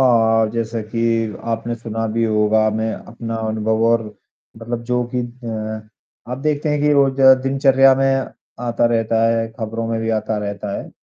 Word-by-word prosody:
हाँ, 115 -3 +4
जैसे 115 0 -3
कि 115 +2 -5 0.5
आपने 115 +1 -2
सुना 115 -1 -4
भी 115 0 +1
होगा 110 0 +2
मैं 110 0 -1
अपना 115 0 -7
अनुभव 110 0 0
और 115 -1 +3 0.6
मतलब 120 0 -4
जो 125 0 0
कि - - +1
अ, 115 -3 -5 0.5
आप 125 - -4
देखते 150 +1 -1
हैं 150 -1 0
कि 150 0 +3
रोज़ 135 -1 +2 0.2
दिनचर्या 135 0 +4
में 135 0 +1 0.4
आता 120 0 +1
रहता 115 -1 +1
है, 115 0 +1
खबरों 115 0 -3
में 115 -1 -1
भी 115 0 -1
आता 110 0 -2
रहता 100 0 -4
है, - - -8
115 Hz, 170 wpm, -19 LUFS, 110-125 Hz, 0.6 s, हाँ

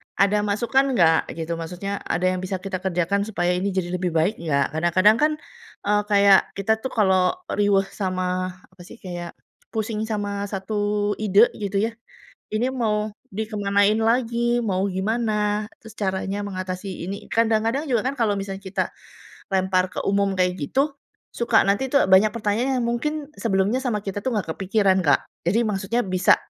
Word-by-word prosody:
"Ada 200 +1 +3
masukan 245 +6 +1
nggak?" 165 -4 +3
gitu. 165 0 -3
Maksudnya 180 +4 -4
ada 175 +3 -1
yang 185 - -1
bisa 185 +1 -3
kita 195 -1 -3
kerjakan, 190 +2 0
supaya 175 -4 -1
ini 190 +2 -1
jadi 180 -2 -1
lebih 180 -1 -1
baik 165 +7 +2
nggak, 140 -4 0
kadang-kadang 185 +6 +4
kan, 305 +1 +4 0.6
eee, 210 0 +3
kayak, 200 -1 +6 0.2
kita 200 +3 +2
tuh 260 - -3
kalau 190 -4 +3 0.2
riweuh 200 -1 +3
sama, 185 -1 -2 0.2
apa 185 -1 -17
sih, - - -12
kayak, 175 -2 -6 0.4
pusing 220 0 -2
sama 205 -2 -2
satu 205 +1 -1
ide, 210 +2 +5
gitu 200 -1 -1
ya, 230 - 0 0.6
ini 240 +4 +1
mau 215 -4 0 0.2
dikemanain 205 0 +1
lagi, 235 +1 +1
mau 190 -2 0
gimana, 210 +1 0
terus 220 0 -13
caranya 195 0 -2
mengatasi 185 -1 -5
ini. 200 +1 -6
Kadang-kadang 225 +5 +1
juga 235 -3 +2
kan 280 - -3
kalau 215 -3 +2
misalnya 195 0 -6
kita, 190 -1 -1 0.7
lempar 185 -1 +1
ke - - -4
umum 200 0 +2
kayak 180 0 +2
gitu, 275 - 0 0.4
suka 235 - +3
nanti 205 +7 +1
tuh 280 - +4
banyak 200 +3 +6
pertanyaan 235 +4 0
yang 235 - -1
mungkin, 290 +5 -2
sebelumnya 205 +2 +1
sama 215 -4 0
kita 200 0 -3
tuh 260 - 0
nggak 165 -6 -2
kepikiran 195 -1 +2
Kak. 145 - +3 0.2
Jadi 210 +7 +3
maksudnya, 210 +3 -1
bisa 185 0 +4
200 Hz, 165 wpm, -23 LUFS, 185-220 Hz, 0.7 s, kayak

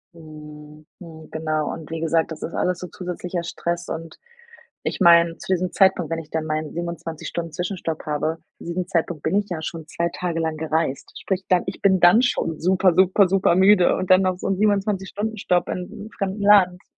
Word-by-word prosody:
Mhm. 150 -1 -13
Hm, 160 -3 -12
genau 155 -1 -2
und 160 -1 -9
wie 165 0 -4
gesagt, 165 0 0
das 160 - -7
ist 170 - -5
alles 180 -1 -1
so 180 - -6
zusätzlicher 180 0 -5
Stress 170 0 -4
und 165 0 -6 0.7
ich - - -2
meine, 170 -2 +5
zu - - -6
diesem 180 0 -1
Zeitpunkt, 190 -4 +2
wenn 165 - -1
ich 155 -1 -11
dann 160 -1 -2
meinen 155 0 -3
27- 170 -2 -5
Stunden 165 -2 -5
Zwischenstopp 175 -2 -4
habe, 155 +2 -1 0.2
zu - - -13
diesem 175 +1 -3
Zeitpunkt 165 -3 -2
bin 185 +6 +1
ich 205 - -5
ja 165 -3 -4
schon 160 0 -6
2 170 +2 -2
Tage 170 -2 -2
lang 160 -1 -2
gereist. 160 -3 -2
Sprich, 190 -1 -2
dann 180 -1 +3
ich 190 - -6
bin 190 -2 +4
dann 180 +7 +7
schon 165 -10 -1
super, 185 +1 +3
super, 190 +1 +4
super 190 -3 +3
müde 190 -1 +5
und 185 0 -2
dann 185 +1 +6
noch 185 -1 0
so - - -5
'n 195 -1 0
27- 200 -2 0
Stunden 215 +1 -4
Stopp 180 -2 0
in 180 -1 -4
'nem 215 - -10
fremden 195 +1 -4
Land. 190 -3 +5
175 Hz, 210 wpm, -22 LUFS, 160-185 Hz, 0.7 s, dann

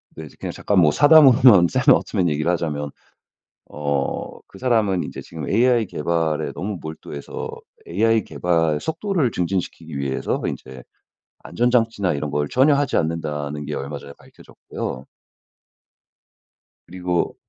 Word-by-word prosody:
네 80 -1 -8
그냥 - - -4
잠깐 100 -2 0
뭐 80 -4 +5
사담으로만 130 - +7
샘 130 +2 +3
올트먼 90 -4 0
얘기를 75 +3 -1
하자면 75 -4 -2 0.8
어 70 -2 -1 0.4
그 95 - -15
사람은 110 -7 +1
이제 - - -8
지금 80 -3 -8
AI 120 +1 +3
개발에 80 -2 -1
너무 100 +2 -5
몰두해서 80 -2 -7 0.4
AI 110 +3 +1
개발 80 -3 0
속도를 160 - -1
증진시키기 85 -4 -3
위해서 70 -1 -2
인제 65 -1 -6 0.6
안전장치나 115 -6 0
이런 75 +1 -3
걸 75 0 -1
전혀 140 +3 +4
하지 140 -1 0
않는다는 75 -2 -3
게 - - -5
얼마 70 +1 -5
전에 70 0 -11
밝혀졌고요. 65 +1 -8 1.8
그리고 90 -1 -2
85 Hz, 300 characters per minute, -21 LUFS, 75-115 Hz, 1.8 s, 사담으로만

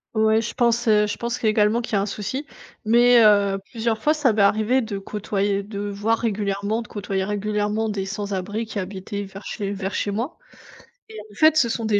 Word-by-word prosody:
Ouais, 220 0 +3
je 230 - -5
pense, 235 0 +1
heu, 210 -1 +5
je 210 - -4
pense 235 0 -4
également 215 +1 +3
qu'il 230 - -7
y - - +4
a 195 - +2
un 200 - -2
souci. 215 +9 -4 0.4
Mais 240 +2 +5
heu, 200 -2 +4
plusieurs 225 -2 -2
fois, 305 +5 +3
ça 285 -7 +2
m'est 210 - +1
arrivé 215 +6 +3
de 215 -4 -4
côtoyer, 200 0 -2
de 200 0 -6
voir 205 +3 0
régulièrement, 205 0 -1
de 230 - -10
côtoyer 195 -2 -3
régulièrement 210 +1 -1
des 195 -2 -3
sans-abris 205 +1 -3
qui 220 -1 -5
habitaient 195 +2 -5
vers 195 0 -11
chez 200 -3 -4
vers 195 -1 -4
chez - - -1
moi 235 +11 -3 0.7
et 220 - -10
en - - -16
fait, 315 +5 +5
ce 265 - +4
sont 230 0 -2
des 210 -2 +2
210 Hz, 210 wpm, -23 LUFS, 200-230 Hz, 0.7 s, heu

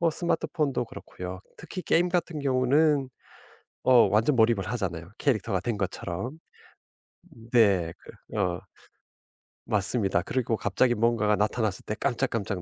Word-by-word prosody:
뭐 170 -1 +3
스마트폰도 150 -6 -1
그렇고요. 90 -1 -8 0.2
특히 185 - -7
게임 175 +2 +2
같은 175 -3 -1
경우는 140 +1 +2 0.8
어 125 -4 +6
완전 110 +7 +3
몰입을 110 -5 +3
하잖아요. 90 -7 -3
캐릭터가 110 -8 0
된 110 +1 -2
것처럼. 95 - -4 1.0
음 115 0 -15
네. 100 -8 +3
그 - - -12
어. 90 -3 0 1.1
맞습니다. 100 -3 +2
그리고 115 0 -1
갑자기 120 +5 +2
뭔가가 115 -2 +2
나타났을 105 -1 -1
때 105 - -3
깜짝깜짝 115 -6 -1
115 Hz, 300 characters per minute, -27 LUFS, 100-130 Hz, 1.1 s, 어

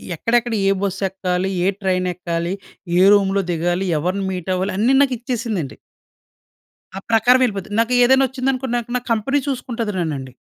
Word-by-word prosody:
ఎక్కడెక్కడ, 235 +6 0
ఏ 195 - +4
బస్ 195 -1 -2
ఎక్కాలి, 185 0 -2
ఏ - - +2
ట్రైన్ 185 -1 0
ఎక్కాలి, 170 0 -3 0.5
ఏ - - +5
రూమ్‌లో 195 -1 +2
దిగాలి, 175 +3 -1
ఎవరిని 185 +4 -2
మీట్ 185 0 -4
అవ్వాలి, 185 +2 -2
అన్ని 240 +6 +3
నాకిచ్చేసిందండి. 235 - -2 1.2
ఆ - - -3
ప్రకారం 245 +3 +4
ఎళ్ళిపోతది. 200 -3 -4
నాకు 230 +2 +1
ఏదైనా 265 +2 +5
ఒచ్చిందనుకొండి 260 -1 -2
నాక్ 240 0 -5
నా - - -5
కంపెనీ 230 +6 +1
చూసుకుంటది 240 -5 -3
నన్నండి. 140 -6 -4
200 Hz, 150 wpm, -20 LUFS, 180-245 Hz, 1.2 s, ఏ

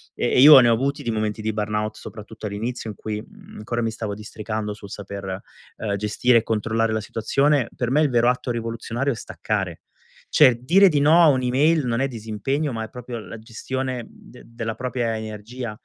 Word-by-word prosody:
e - - 0
e - - +4
io 145 0 +11
ne 120 -2 +5
ho - - +5
avuti 140 +5 -1
di 120 - -3
momenti 110 -1 -2
di 110 0 -2
burnout 105 0 -2
soprattutto 110 0 -10
all'inizio 115 +3 -4
in - - -12
cui, 105 +1 -4
mhmm, - - -15
ancora 120 +2 -3
mi 115 - 0
stavo 110 -2 -4
districando 105 0 -5
sul 100 -1 -12
saper, 100 -1 -6 0.4
ehm, 105 -2 -2
gestire 105 +4 +2
e - - -7
controllare 115 0 0
la 110 - -1
situazione, 135 +5 +1
per 120 - -2
me 150 +3 +3
il 150 - +3
vero 120 0 +4
atto 125 0 -1
rivoluzionario 115 +3 -2
è - - -7
staccare. 100 -5 -4 0.5
Cioè 125 - +6
dire 190 +9 +6
di 150 -4 +1
no 155 +4 +5
a 165 - +7
un'email 135 +4 +2
non 120 0 0
è 135 - +2
disimpegno 120 +5 -3
ma 115 -1 -3
è 110 - -7
proprio 125 -1 -7
la 110 +1 -9
gestione 130 +3 -4
de 125 - -16
della 115 -1 -5
propria 120 -2 -2
energia 110 +2 -6
115 Hz, 200 wpm, -23 LUFS, 110-130 Hz, 0.5 s, io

